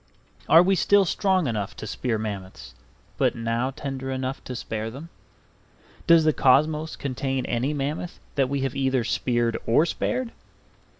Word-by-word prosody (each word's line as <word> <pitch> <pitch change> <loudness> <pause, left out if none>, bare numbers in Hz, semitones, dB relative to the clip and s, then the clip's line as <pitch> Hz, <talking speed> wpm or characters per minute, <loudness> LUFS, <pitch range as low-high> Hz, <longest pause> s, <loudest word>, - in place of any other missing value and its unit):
Are 165 +2 +8
we 195 +2 +3
still 200 +2 +4
strong 185 0 +1
enough 105 -6 -3
to - - -7
spear 115 +2 -2
mammoths, 100 -3 -6 0.5
but - - +2
now 115 +2 -1
tender 135 -1 -5
enough 130 0 -3
to 125 - -5
spare 110 -2 -4
them? 140 +8 -9 1.0
Does 170 -2 +7
the 155 -1 +3
cosmos 150 +4 +2
contain 135 -1 -3
any 120 +4 -1
mammoth 150 +4 -4
that 135 -2 +1
we 140 0 -1
have 135 -2 -2
either 135 -2 +1
speared 120 0 0
or 120 +8 +4
spared? 245 +7 -2
135 Hz, 155 wpm, -25 LUFS, 120-155 Hz, 1.0 s, Are